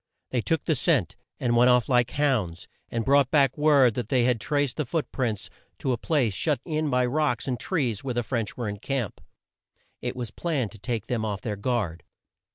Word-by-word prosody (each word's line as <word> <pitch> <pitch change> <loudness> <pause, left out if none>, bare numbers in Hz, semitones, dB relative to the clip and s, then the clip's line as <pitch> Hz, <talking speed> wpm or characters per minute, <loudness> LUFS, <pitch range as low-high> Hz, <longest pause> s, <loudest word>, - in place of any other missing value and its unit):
They 125 - +1
took 165 +7 0
the 160 - +2
scent, 135 - +1 0.2
and 120 -2 +1
went 120 +1 +6
off 125 -1 +4
like 120 -2 +3
hounds, 115 - 0 0.2
and 115 -1 -2
brought 140 -1 +4
back 140 -4 +3
word 145 -5 +5
that 120 0 -4
they 125 -3 +3
had 120 -2 +2
traced 145 -3 0
the 155 - +1
foot 155 +5 -2
prints 105 -8 -2 0.3
to 135 - -1
a 120 - +1
place 130 -10 +1
shut 145 - +1
in 155 -2 -1
by 125 -1 +2
rocks 125 -2 0
and 125 -2 -1
trees 125 - -1
where 130 -3 -3
the 120 - 0
French 115 -3 -3
were 120 -3 -2
in 105 0 -4
camp. 130 -3 -3 0.8
It - - -3
was 120 -4 -5
planned 140 -6 -2
to 110 - -13
take 110 +1 -3
them 120 -3 -2
off 100 -3 -3
their 105 -1 -3
guard. 100 -6 -1
125 Hz, 210 wpm, -26 LUFS, 115-140 Hz, 0.8 s, went